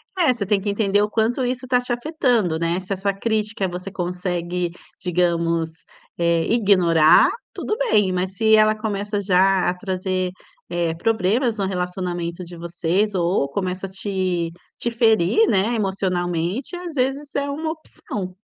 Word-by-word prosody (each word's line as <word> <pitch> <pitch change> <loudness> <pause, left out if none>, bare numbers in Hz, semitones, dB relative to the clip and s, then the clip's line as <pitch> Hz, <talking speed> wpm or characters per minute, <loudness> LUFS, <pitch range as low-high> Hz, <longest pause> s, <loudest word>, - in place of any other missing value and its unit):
É, 335 -8 +3
você 225 -5 -4
tem 205 0 +2
que 205 - -2
entender 200 0 +2
o 210 - +1
quanto 230 +4 +1
isso 255 +1 -2
está 250 -1 +2
te 245 0 -4
afetando, 240 - +1
né? 170 +2 0
Se 190 +1 -11
essa 195 +1 -1
crítica 215 -1 -1
você 180 +2 -6
consegue, 180 -1 -2 0.3
digamos, 170 -2 +1 0.5
eh, 170 -1 +2
ignorar, 180 -8 +5 0.2
tudo 430 - -3
bem. 215 - +2
Mas 185 +1 -2
se 220 +2 +4
ela 215 0 +5
começa 205 -1 -2
já 190 -1 +3
a - - 0
trazer, 185 -1 -2 0.4
eh, 170 -1 -1
problemas 225 +5 +1
no 195 - 0
relacionamento 180 -1 -3
de 175 0 -9
vocês 175 +4 -1
ou 175 -4 +1
começa 185 +4 -3
a - - -7
te-te 185 0 -3
ferir, 225 - +3
né, 210 - +2
emocionalmente, 190 - -1
às 350 -3 -7
vezes 275 +2 -1
é 280 0 0
uma 315 +3 -2
opção. 205 - -7
195 Hz, 150 wpm, -22 LUFS, 180-225 Hz, 0.5 s, ignorar